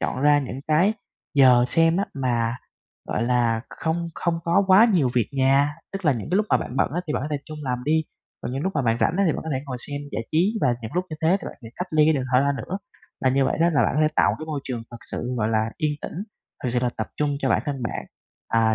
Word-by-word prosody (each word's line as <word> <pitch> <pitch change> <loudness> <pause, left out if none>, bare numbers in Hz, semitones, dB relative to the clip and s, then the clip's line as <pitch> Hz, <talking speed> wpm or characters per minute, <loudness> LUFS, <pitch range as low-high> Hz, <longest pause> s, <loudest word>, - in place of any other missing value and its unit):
chọn 130 - -2
ra 145 0 +5
những 135 -1 -4
cái 175 +8 +4 0.4
giờ 125 -3 +6
xem 165 +4 +3
á 200 - +1
mà, 120 -3 0 0.5
gọi 110 - -1
là, 120 -2 +2
không 170 +1 -2
không 170 -1 -1
có 170 +4 +3
quá 195 +5 +7
nhiều 150 -9 +3
việc 120 -4 +2
nhà, 140 +2 +3 0.2
tức 195 -2 -5
là 150 - +5
những 115 -4 -5
cái 185 - +2
lúc 215 0 +2
mà - - +6
bạn 125 - -5
bận - - +2
á 175 - 0
thì 150 - -2
bạn - - -1
có 150 - -3
thể 145 - 0
trung 155 -1 -8
làm 125 -2 -1
đi, 160 +1 +2 0.4
còn 125 - -4
những 135 +2 -3
lúc 190 - -1
mà 145 - +1
bạn 115 -1 +2
rảnh 165 - +2
á 200 - +3
thì 160 - +3
bạn - - -4
có 160 - -5
thể 130 - -1
ngồi 130 -2 -4
xem 145 +2 -5
giải 115 - -2
trí 185 +8 +2
và 120 - +3
những 110 - -5
lúc 180 +1 0
như 155 - -5
thế 170 +4 +4
thì - - -8
bạn - - -8
hãy 115 - -9
cách 180 - -3
ly 155 -1 +4
cái 160 - +4
điện 135 -3 -1
thoại 125 +2 +5
ra 140 0 +2
nữa. 185 +10 -4 0.5
Và 130 - +5
như 135 +1 +2
vậy - - 0
đó 170 +1 +4
là 145 - +3
bạn - - +1
có 150 - +2
thể 155 - +4
tạo - - +5
một - - -3
cái 155 - -7
môi 150 -3 -3
trường 120 -3 -4
thực 120 - -9
sự, 125 +1 -3
gọi 110 -1 0
là, 110 0 +1
yên 150 -1 0
tĩnh, - - -6 0.5
thực 125 - -1
sự 125 - +1
là 120 - +1
tập 110 - -2
trung 150 -1 +1
cho 135 - 0
bản 110 +1 +2
thân 140 -3 -3
bạn, 115 - -3 0.4
à, 115 -1 +3
140 Hz, 295 wpm, -24 LUFS, 125-160 Hz, 0.5 s, quá